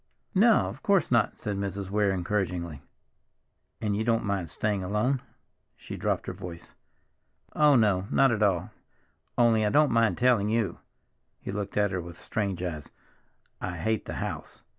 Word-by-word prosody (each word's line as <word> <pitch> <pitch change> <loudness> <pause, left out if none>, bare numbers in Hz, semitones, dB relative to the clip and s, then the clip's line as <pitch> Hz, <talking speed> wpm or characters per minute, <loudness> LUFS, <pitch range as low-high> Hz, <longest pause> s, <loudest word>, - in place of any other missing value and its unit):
"No, 220 +3 +5
of - - -8
course 195 -9 +2
not," 115 -3 +2
said 105 -2 -3
Mrs. 100 -1 -4
Weir 105 -1 +2
encouragingly. 90 -5 -2 1.0
"And 105 -2 -1
you 110 - 0
don't 115 -1 +1
mind 100 -4 -2
staying 105 +2 -1
alone?" 110 +8 0 0.5
she - - -8
dropped - - -1
her - - -4
voice. 85 -1 -9 0.8
"Oh, 150 -2 +5
no, 100 -5 +3
not 135 -2 +4
at 110 -2 -1
all. 95 -5 +1 0.7
Only—I 115 -3 +4
don't 150 +6 +4
mind 115 -1 +3
telling 120 -5 +3
you—" 110 -6 0 0.6
he - - -6
looked 100 0 -4
at 105 -1 +2
her 90 -2 -2
with 85 0 -10
strange 100 -4 -2
eyes—"I 85 +2 -8
hate 110 +6 -1
the - - -5
house! - - -5
105 Hz, 155 wpm, -28 LUFS, 95-115 Hz, 1.0 s, No